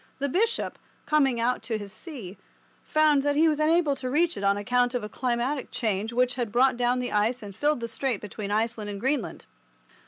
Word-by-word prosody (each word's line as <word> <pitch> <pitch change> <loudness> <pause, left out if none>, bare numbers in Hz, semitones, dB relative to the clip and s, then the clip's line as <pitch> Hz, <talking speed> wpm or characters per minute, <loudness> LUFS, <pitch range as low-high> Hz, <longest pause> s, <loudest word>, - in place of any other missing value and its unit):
The 280 +1 -1
bishop, 450 - 0 0.3
coming 275 -5 +2
out 245 +2 +1
to 225 -3 -3
his 205 -1 -8
see, 220 - -9 0.4
found 310 -2 +3
that 290 +1 0
he 320 +2 +5
was 305 -1 +1
unable 310 -1 +3
to 255 -1 -4
reach 335 +5 +2
it 200 - -6
on 200 0 +3
account 245 +4 +1
of 245 - -1
a - - -3
climatic 250 +4 -2
change 215 -1 -2
which 250 +1 +2
had 240 -4 -3
brought 255 +2 +4
down 245 +1 +1
the 250 0 -3
ice 220 +4 +1
and 200 -2 -9
filled 295 0 +1
the 230 - -2
strait 240 -1 -2
between 210 0 -6
Iceland 220 0 -1
and 200 -1 -5
Greenland. 265 +1 -2
245 Hz, 210 wpm, -26 LUFS, 220-285 Hz, 0.4 s, he